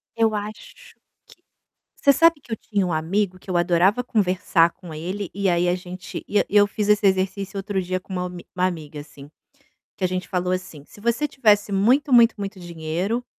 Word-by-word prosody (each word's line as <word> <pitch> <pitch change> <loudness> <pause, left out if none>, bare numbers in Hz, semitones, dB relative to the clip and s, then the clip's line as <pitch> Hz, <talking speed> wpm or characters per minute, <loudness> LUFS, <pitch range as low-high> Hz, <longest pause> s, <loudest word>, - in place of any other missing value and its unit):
Eu 225 -1 +2
acho 210 +1 -6
que - - -18 1.0
você 280 - +4
sabe 330 0 +4
que 235 - -12
eu - - 0
tinha 200 -3 -2
um 175 - -2
amigo, 185 +4 -1
que 190 - -23
eu 180 - 0
adorava 180 +6 +3
conversar 185 -6 +2
com 175 -2 -12
ele, 180 +5 -5
e 200 0 -1
aí 175 0 +2
a 175 - +2
gente, 180 0 -8
e 205 - +2
eu 205 0 +5
fiz 205 0 -3
esse 210 0 +4
exercício 195 +1 0
outro 195 0 -2
dia 185 0 -3
com 190 - -12
uma 180 -1 -2
almi 180 -1 -6
uma 180 0 +2
amiga 155 -5 -5
assim, 145 -1 -13 0.7
que - - -6
a 185 - +4
gente 185 0 -4
falou, 180 0 -1
assim: 180 -6 -6
"Se 205 - -17
você 235 +7 0
tivesse 210 -7 +2
muito 250 +9 +2
muito 235 -1 +6
muito 200 -1 -6
dinheiro, 175 +8 -3
190 Hz, 200 wpm, -23 LUFS, 180-210 Hz, 1.0 s, muito